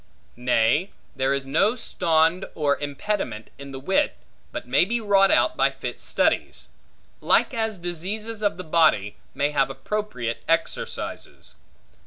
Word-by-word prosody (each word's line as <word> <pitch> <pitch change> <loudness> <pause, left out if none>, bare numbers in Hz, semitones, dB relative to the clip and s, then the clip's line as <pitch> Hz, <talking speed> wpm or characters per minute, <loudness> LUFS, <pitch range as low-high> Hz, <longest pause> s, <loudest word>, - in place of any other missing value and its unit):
Nay, 125 - +2 0.3
there 135 0 +1
is 140 -1 -1
no 195 - +2
stond 165 -5 +1
or 145 -2 +2
impediment 145 - -3
in 140 0 -8
the 135 -1 -7
wit, 190 +8 +1 0.3
but - - -6
may 130 +6 +4
be 235 +6 0
wrought 200 -3 +4
out - - +3
by - - +3
fit - - -6
studies; - - 0 0.5
like - - +3
as 220 -3 -1
diseases 195 +6 -4
of 205 -1 0
the 185 - -6
body, 155 - +2 0.2
may 145 +1 +1
have 135 -2 +2
appropriate 135 - -3
exercises. 165 - -3
165 Hz, 140 wpm, -24 LUFS, 135-205 Hz, 0.5 s, may